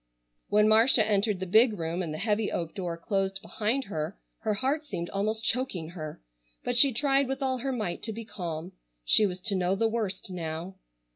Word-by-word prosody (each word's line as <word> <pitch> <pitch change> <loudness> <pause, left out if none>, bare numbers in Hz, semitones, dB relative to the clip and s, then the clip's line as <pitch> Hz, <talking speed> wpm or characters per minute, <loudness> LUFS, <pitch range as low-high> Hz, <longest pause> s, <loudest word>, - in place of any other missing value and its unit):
When 210 +1 +4
Marcia 220 +1 +6
entered 205 -1 +2
the 190 - -2
big 220 +4 +5
room 165 +2 -2
and 165 -4 -3
the 155 - -4
heavy 210 +3 0
oak 165 -2 -3
door 180 -4 -4
closed 195 +1 -1
behind 220 +5 -1
her 160 -3 -4 0.2
her 215 -1 0
heart 270 +7 0
seemed 180 - -5
almost 215 +3 -1
choking 225 -10 -1
her, 155 -3 -7 0.4
but 245 - -1
she 270 +3 +7
tried 275 +2 +2
with 270 +1 -3
all 260 -1 0
her 270 +2 -2
might 210 -9 -3
to 225 - -2
be 225 +1 -6
calm. 170 -4 -5 0.3
She 210 - +5
was 180 -1 -5
to 200 +1 0
know 185 0 +1
the 225 +3 +2
worst 210 -4 -3
now. 165 +1 -4
205 Hz, 200 wpm, -28 LUFS, 180-230 Hz, 0.4 s, she